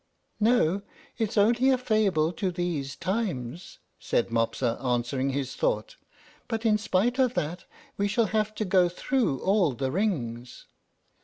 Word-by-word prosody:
"No, 210 Hz, -5 st, +3 dB, 0.4 s
it's 220 Hz, 0 st, -1 dB
only 235 Hz, +5 st, +4 dB
a 260 Hz, -, +4 dB
fable 205 Hz, -10 st, +1 dB
to 190 Hz, +2 st, -1 dB
these 170 Hz, -6 st, -3 dB
times," 180 Hz, -, -3 dB, 0.2 s
said -, -, 0 dB
Mopsa, 115 Hz, +2 st, 0 dB
answering 125 Hz, +2 st, 0 dB
his 135 Hz, -1 st, -3 dB
thought; -, -, -1 dB, 0.5 s
"but 225 Hz, -1 st, -3 dB
in 215 Hz, -1 st, +4 dB
spite 225 Hz, +5 st, +1 dB
of 255 Hz, -2 st, +2 dB
that 175 Hz, +1 st, -3 dB, 0.3 s
we 200 Hz, -, +1 dB
shall 225 Hz, +3 st, +2 dB
have 215 Hz, 0 st, 0 dB
to 215 Hz, -, -2 dB
go 185 Hz, -2 st, +4 dB
through 200 Hz, -, 0 dB
all 190 Hz, -7 st, +2 dB
the 130 Hz, +2 st, -2 dB
rings." 125 Hz, -, -2 dB
185 Hz, 145 wpm, -27 LUFS, 135-220 Hz, 0.5 s, only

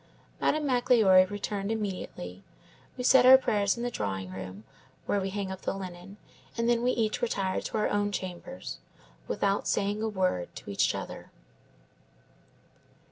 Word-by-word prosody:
"Madame 305 Hz, 0 st, +1 dB
Magloire 225 Hz, -8 st, +5 dB
returned 205 Hz, 0 st, -3 dB
immediately. 180 Hz, -, -5 dB, 0.5 s
We 250 Hz, -, -3 dB
said 250 Hz, 0 st, +6 dB
our 260 Hz, +1 st, +11 dB
prayers 205 Hz, -4 st, +1 dB
in 235 Hz, -, -4 dB
the 245 Hz, -, -1 dB
drawing 95 Hz, -, -3 dB
room, 95 Hz, +2 st, -8 dB, 0.4 s
where 200 Hz, -, 0 dB
we 190 Hz, -, -2 dB
hang 195 Hz, -1 st, -3 dB
up 190 Hz, -, -7 dB
the -, -, -2 dB
linen, 185 Hz, +1 st, -8 dB, 0.4 s
and 230 Hz, 0 st, +1 dB
then 235 Hz, -1 st, +3 dB
we 245 Hz, -, +2 dB
each 225 Hz, 0 st, 0 dB
retired 195 Hz, -5 st, -1 dB
to -, -, -3 dB
our 210 Hz, -, +2 dB
own 205 Hz, 0 st, 0 dB
chambers, 190 Hz, +8 st, -6 dB, 0.5 s
without 200 Hz, 0 st, 0 dB
saying 205 Hz, +2 st, 0 dB
a 220 Hz, -, 0 dB
word 185 Hz, -, -1 dB
to -, -, -8 dB
each 100 Hz, -, +2 dB
other." -, -, -7 dB
200 Hz, 155 wpm, -29 LUFS, 185-230 Hz, 0.5 s, our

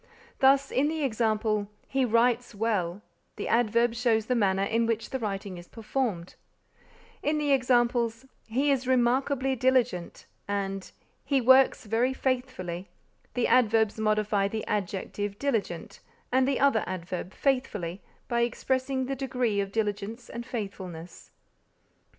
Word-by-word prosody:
Thus, 275 Hz, +1 st, +4 dB
in 275 Hz, +3 st, +2 dB
the 315 Hz, 0 st, -2 dB
example 215 Hz, -4 st, 0 dB, 0.2 s
"He 265 Hz, -1 st, +1 dB
writes 235 Hz, 0 st, +2 dB
well," 205 Hz, -3 st, -1 dB, 0.3 s
the -, -, -4 dB
adverb 235 Hz, 0 st, +2 dB
shows 230 Hz, -2 st, +1 dB
the 250 Hz, -, 0 dB
manner 195 Hz, -4 st, +2 dB
in 230 Hz, +3 st, +1 dB
which 225 Hz, -1 st, -2 dB
the 265 Hz, -, -2 dB
writing 195 Hz, -4 st, -4 dB
is 175 Hz, -, -13 dB
performed; 220 Hz, -6 st, -3 dB, 0.9 s
in 305 Hz, +1 st, +1 dB
the 295 Hz, -1 st, 0 dB
examples 240 Hz, -2 st, +2 dB, 0.2 s
"He 270 Hz, +6 st, +1 dB
is 260 Hz, -2 st, 0 dB
remarkably 260 Hz, +2 st, +2 dB
diligent" 250 Hz, -8 st, 0 dB, 0.2 s
and 195 Hz, -1 st, -3 dB, 0.3 s
"He 275 Hz, -2 st, +2 dB
works 260 Hz, 0 st, +5 dB
very 235 Hz, +5 st, +1 dB
faithfully," 250 Hz, -10 st, -2 dB, 0.5 s
the 245 Hz, -, +1 dB
adverbs 225 Hz, -3 st, +3 dB
modify 215 Hz, -2 st, +1 dB
the 220 Hz, +2 st, -4 dB
adjective 205 Hz, 0 st, -3 dB
diligent 215 Hz, -11 st, -2 dB, 0.3 s
and 260 Hz, +1 st, +3 dB
the 275 Hz, -, +1 dB
other 275 Hz, -6 st, +3 dB
adverb 180 Hz, 0 st, -5 dB
faithfully 205 Hz, -11 st, -1 dB, 0.3 s
by 235 Hz, 0 st, +1 dB
expressing 260 Hz, +2 st, 0 dB
the 270 Hz, +1 st, -2 dB
degree 250 Hz, -5 st, -1 dB
of 195 Hz, -1 st, -4 dB
diligence 215 Hz, +2 st, -3 dB
and 235 Hz, +1 st, -6 dB
faithfulness. 185 Hz, -7 st, -7 dB
230 Hz, 135 wpm, -28 LUFS, 205-260 Hz, 0.9 s, works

